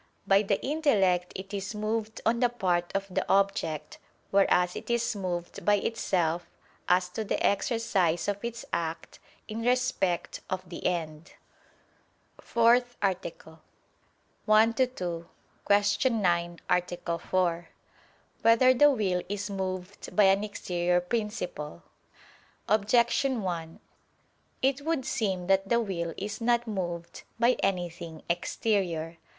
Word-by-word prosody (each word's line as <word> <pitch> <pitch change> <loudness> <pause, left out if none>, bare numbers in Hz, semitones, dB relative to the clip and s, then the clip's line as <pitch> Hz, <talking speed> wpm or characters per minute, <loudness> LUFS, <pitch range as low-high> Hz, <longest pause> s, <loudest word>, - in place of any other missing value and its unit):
By 195 0 +5
the 200 -1 0
intellect 205 - +2
it 195 +2 -7
is 200 +1 -4
moved 220 +1 -2
on 235 +1 +2
the 245 -1 +3
part 180 -7 0
of 195 0 0
the - - +1
object: 165 -6 0 0.3
whereas 180 -2 +3
it - - -7
is 235 -1 0
moved 175 -3 -4
by 205 - +4
itself, 175 -5 -1 0.4
as 180 0 +4
to 220 +5 -4
the 205 - -1
exercise 200 -6 +1
of 205 +1 -2
its 235 0 -5
act, 165 0 -3 0.3
in 220 +1 -5
respect 245 -7 0
of 185 0 -3
the 175 - -3
end. 160 -2 -4 1.1
________________________ - - -16
FOURTH 240 +1 +3
ARTICLE 170 -4 -3 0.9
[I 220 +2 +6
II, 260 - +5 0.8
Q. 205 +5 +3
9, 175 -6 0
Art. 180 0 +1 0.3
4] 175 -2 0 0.7
Whether 230 +3 +6
the 290 +4 +6
Will 195 -9 +1
Is 205 -1 -3
Moved 185 0 -5
by 210 - +6
an 195 +1 +4
Exterior 180 -4 0
Principle? 180 - -4 0.8
Objection 235 +4 +2
1: 165 -3 -4 0.8
It 270 +1 +2
would 310 -3 -1
seem 190 -5 -1
that 195 +1 +2
the 235 - +4
will 170 -7 -3
is 210 +4 -5
not 240 0 +2
moved 175 -6 -4 0.2
by 235 +1 +5
anything 175 -4 -3
exterior. 170 -2 -1
195 Hz, 125 wpm, -28 LUFS, 175-225 Hz, 1.1 s, I